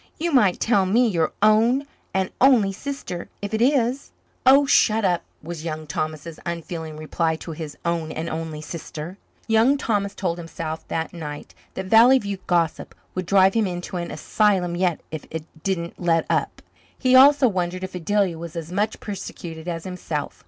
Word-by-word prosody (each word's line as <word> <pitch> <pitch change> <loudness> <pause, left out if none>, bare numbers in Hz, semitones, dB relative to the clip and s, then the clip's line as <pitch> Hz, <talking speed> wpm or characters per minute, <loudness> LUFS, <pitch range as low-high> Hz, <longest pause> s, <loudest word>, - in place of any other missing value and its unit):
You 340 +2 -1
might 210 - +4
tell 200 -5 +2
me, 235 +6 +4
your 165 -7 +1
own 230 +6 +4 0.3
and 190 -1 -1
only 245 -7 +5
sister, 200 -6 -6
if 205 +1 -5
it 220 - 0
is." 260 0 +2 0.4
"Oh, 275 +2 +7
shut 220 -5 +3
up," 175 -2 +2 0.2
was 165 -1 -6
Young 155 -1 -4
Thomas's 155 +2 -4
unfeeling 165 -2 -5
reply 160 +1 -1
to 165 - -8
his 155 -1 -7
own 165 -2 -1
and 160 +2 -4
only 160 -2 -4
sister. 165 +3 -7 0.3
Young 230 +5 +4
Thomas 205 -6 -1
told 175 -3 -2
himself 165 -1 -6
that 160 0 -3
night 150 -4 -7 0.2
that 190 - -4
Valley 230 +6 +7
View 200 -5 -4
gossip 170 -3 0 0.2
would 185 -1 -4
drive 190 0 +5
him 225 -3 +2
into 180 0 -5
an 170 -1 -4
asylum 190 -5 +1
yet 175 -2 0
if 155 -2 -6
it 160 -1 -5 0.2
didn't 170 -2 -2
let 165 -2 +2
up. - - -1 0.3
He 255 -1 +3
also 275 +1 +7
wondered 185 -3 -2
if 185 - -5
Adelia 185 -1 0
was 170 0 -8
as 165 0 -5
much 205 +4 -1
persecuted 175 -5 -7
as 165 -2 -3
himself. 170 -5 -5
180 Hz, 175 wpm, -23 LUFS, 165-215 Hz, 0.4 s, Oh